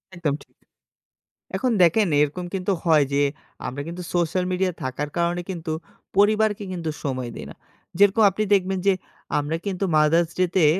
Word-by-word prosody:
একদম 165 Hz, -5 st, -1 dB
ঠিক। -, -, -14 dB, 1.1 s
এখন 255 Hz, -2 st, +1 dB
দেখেন 190 Hz, +5 st, +5 dB
এরকম 150 Hz, +5 st, -1 dB
কিন্তু 190 Hz, +1 st, -1 dB
হয় 155 Hz, -3 st, +5 dB
যে, 140 Hz, -, +2 dB, 0.5 s
আমরা 135 Hz, +3 st, -4 dB
কিন্তু 175 Hz, +2 st, -6 dB
social 175 Hz, +1 st, +1 dB
media 185 Hz, +1 st, +1 dB
য় -, -, -15 dB
থাকার 130 Hz, +3 st, -3 dB
কারণে 170 Hz, +1 st, +1 dB
কিন্তু 165 Hz, -3 st, -4 dB, 0.5 s
পরিবারকে 210 Hz, 0 st, +3 dB
কিন্তু 165 Hz, -3 st, -3 dB
সময় 130 Hz, -3 st, -2 dB
দেই -, -, -7 dB
না। -, -, -12 dB, 0.4 s
যেরকম 205 Hz, +2 st, +5 dB
আপনি 215 Hz, +3 st, -2 dB
দেখবেন 190 Hz, -1 st, +2 dB
যে 195 Hz, -, +6 dB, 0.5 s
আমরা 150 Hz, +2 st, -2 dB
কিন্তু 195 Hz, -1 st, -1 dB
Mother's 160 Hz, +2 st, +3 dB
Day 185 Hz, -1 st, +3 dB
তে 175 Hz, -, +5 dB
175 Hz, 165 wpm, -24 LUFS, 155-195 Hz, 1.1 s, যে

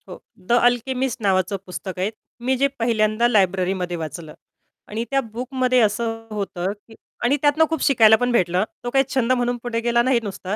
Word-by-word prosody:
हो, -, -, -9 dB, 0.3 s
the -, -, +4 dB
alchemist 245 Hz, +1 st, +1 dB
नावाचं 195 Hz, -1 st, +1 dB
पुस्तक 185 Hz, 0 st, -7 dB
आहे. 190 Hz, +3 st, 0 dB, 0.3 s
मी 255 Hz, +2 st, 0 dB
जे 275 Hz, +2 st, +3 dB
पहिल्यांदा 225 Hz, 0 st, +2 dB
लायब्ररीमध्ये 185 Hz, -4 st, +1 dB
वाचलं 160 Hz, 0 st, -7 dB, 0.5 s
आणि 220 Hz, +2 st, -3 dB
त्या 275 Hz, 0 st, +2 dB
बुकमध्ये 255 Hz, +2 st, -1 dB
असं 225 Hz, +1 st, -1 dB
होतं, 195 Hz, -3 st, -3 dB
की 215 Hz, +2 st, -19 dB, 0.3 s
आणि 260 Hz, +4 st, +3 dB
त्यातनं 295 Hz, +2 st, +4 dB
खूप 320 Hz, -2 st, -2 dB
शिकायला 225 Hz, -5 st, +6 dB
पण 245 Hz, +1 st, 0 dB
भेटलं. 180 Hz, -5 st, +2 dB, 0.2 s
तो 245 Hz, -, -2 dB
काही 270 Hz, +2 st, +3 dB
छंद 255 Hz, -2 st, +1 dB
म्हणून 245 Hz, -1 st, +1 dB
पुढे 240 Hz, -1 st, -2 dB
गेला 235 Hz, 0 st, +2 dB
नाही 255 Hz, -1 st, +2 dB
नुसता. 195 Hz, -1 st, -5 dB
230 Hz, 175 wpm, -22 LUFS, 195-245 Hz, 0.5 s, शिकायला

